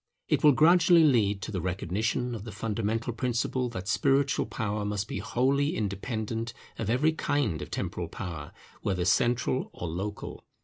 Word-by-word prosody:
It - - +1
will 150 -1 +8
gradually 170 +3 +6
lead 105 -9 +3
to - - -5
the 95 -4 -2
recognition 100 +7 -1
of 110 -4 -5
the 110 - -7
fundamental 115 +2 -2
principle 125 +1 -1
that 100 -5 -6
spiritual 135 +5 +2
power 105 -2 -2
must 105 0 -2
be - - -4
wholly 140 +4 +1
independent 110 +2 -3 0.3
of 110 - -2
every 135 +7 +3
kind 145 - -1
of - - -6
temporal - - -3
power, 80 -6 -6 0.3
whether 90 -3 -1
central 120 +6 +2
or 90 - -5
local. 95 +6 -5
115 Hz, 160 wpm, -28 LUFS, 100-130 Hz, 0.3 s, will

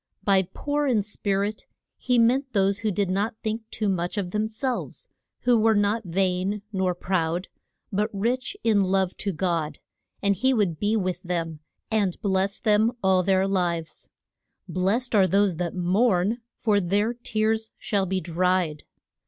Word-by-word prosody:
By 195 -2 +4
poor 290 +4 -1
in 225 -6 +2
spirit 205 0 -2 0.3
he 250 -1 0
meant 260 +4 +3
those 195 -1 +2
who 220 0 0
did 200 -1 0
not 205 +4 0
think 220 +1 -3
too 215 - -2
much 180 0 -1
of 185 -3 -2
them 215 +2 0
selves, 255 - -4 0.3
who 245 -2 +4
were 220 0 +4
not 205 +2 +1
vain 190 +3 0
nor 185 -2 0
proud, 175 -1 -1 0.4
but 210 +3 +1
rich 245 - -2
in 210 -3 +3
love 190 -1 +1
to 200 - -2
God. 165 -3 -1 0.5
And 200 0 +3
he 260 +7 +2
would 190 -8 0
be 210 +2 +1
with 185 -3 -2
them, 165 -3 -3 0.3
and 205 -5 +1
bless 195 -1 +1
them 215 +1 +3
all 190 -1 +4
their 190 +1 +2
lives. 175 -4 -2 0.6
Blest 205 +8 0
are 195 -3 +5
those 195 -3 +2
that 175 0 -3
mourn, 190 +3 +2 0.2
for 210 -3 +2
their 200 +5 +1
tears 220 -2 -1
shall 200 -2 -1
be 190 +1 0
dried. 180 -3 0
200 Hz, 160 wpm, -25 LUFS, 185-220 Hz, 0.6 s, are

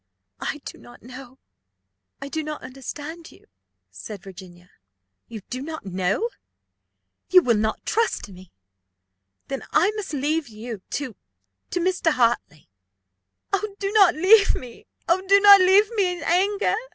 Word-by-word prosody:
"I 295 - -4
do - - -9
not 240 - -16
know. 255 +1 -12 0.9
I - - -6
do 315 +3 -3
not 305 0 -6
understand 290 +5 -8
you," - - -20 0.5
said 180 - -9
Virginia. 180 -2 -13 0.6
"You 225 -3 -8
do 255 +1 -4
not 315 -1 -7
know! 190 - -1 1.0
You 365 -1 +6
will 235 -2 +2
not 220 +1 -2
trust 455 - -1
me. 185 -2 -15 1.0
Then 270 -1 -4
I 370 +6 +3
must 425 -2 -6
leave 300 +2 -1
you 220 -1 -8 0.2
to 260 -7 -6 0.5
to 360 - -2
Mr. 360 -1 +1
Hartley." 235 - 0 1.1
"Do 395 -1 -3
not 390 -5 +5
leave 395 +5 +5
me 245 -2 -10 0.2
oh, 345 +2 +2
do 395 +1 +6
not 400 -1 +9
leave 395 +4 +4
me 365 -4 +1
in - - -8
anger!" 395 +4 +1
295 Hz, 140 wpm, -23 LUFS, 230-375 Hz, 1.1 s, not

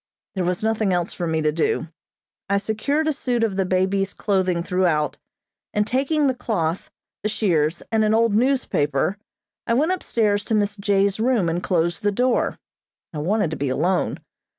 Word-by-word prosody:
There 190 - -1
was 180 +3 -1
nothing 220 -2 +1
else 175 -1 0
for 175 - -3
me 160 -1 0
to 155 - +2
do. 160 +1 -1 0.6
I 200 - +3
secured 250 +10 -1
a 310 - +2
suit 245 -4 -1
of 215 -4 0
the 190 -1 +1
baby's 190 +1 0
clothing 185 -4 0
throughout, 175 -5 +1 0.6
and, 210 0 +2
taking 280 +6 +1
the 265 - +3
cloth, 190 -9 -2 0.3
the 215 - -1
shears, 170 -6 0
and 220 -1 +3
an 215 0 +3
old 230 -1 +3
newspaper, 205 - +1 0.5
I 230 - +2
went 305 +8 +2
upstairs 215 - 0
to 220 - 0
Miss 205 -1 +1
J.'s 200 0 +1
room 225 -7 +2
and 170 +2 -1
closed 175 0 0
the 205 -1 +1
door. 250 +4 +1 0.6
I 150 - -4
wanted 190 +2 0
to - - -3
be 140 -1 -1
alone. 170 +8 0
200 Hz, 175 wpm, -22 LUFS, 175-225 Hz, 0.6 s, I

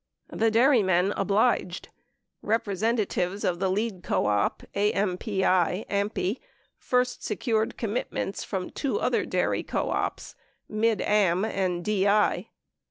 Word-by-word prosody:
The 225 +1 +2
dairymen 215 -6 +3
obliged. 200 -2 +1 0.5
Representatives 205 -2 -1
of 175 -1 0
the 190 0 +1
lead 200 -1 -1
co - - 0
op, 105 -1 0
AMPI, 200 +1 0 0.4
first 250 0 0
secured 220 +1 -1
commitments 215 -3 -3
from 190 -3 -4
two 290 +9 -2
other - - 0
dairy - - 0
co - - -2
ops, - - -3 0.3
Mid 220 +1 +1
Am 200 -2 +2
and 185 -4 -2
DI. 205 0 +2
205 Hz, 105 wpm, -26 LUFS, 185-220 Hz, 0.5 s, dairymen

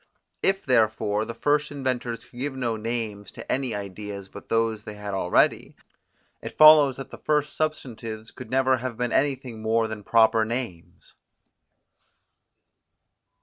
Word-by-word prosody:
If 195 0 +1
therefore 110 -3 +2
the 115 +1 -7
first 150 +4 +1
inventors 125 -4 -3
could 120 - -14
give 135 +1 -3
no 120 -3 -1
names 110 -2 -4
to - - -7
any 130 -4 -1
ideas 100 0 -7
but - - -12
those 115 -2 0
they 105 - -8
had 105 -1 -6
already, 90 -2 +1 0.7
it - - -8
follows 155 -4 +8
that 135 - -8
the - - -10
first 150 -1 0
substantives 115 -8 -4
could 125 -3 -10
never 130 0 +3
have 125 -2 -5
been 125 -1 -1
anything 130 -5 -1
more 110 +1 +1
than 110 -2 -7
proper 110 0 +4
names. 115 -7 -6
115 Hz, 145 wpm, -25 LUFS, 110-130 Hz, 0.7 s, follows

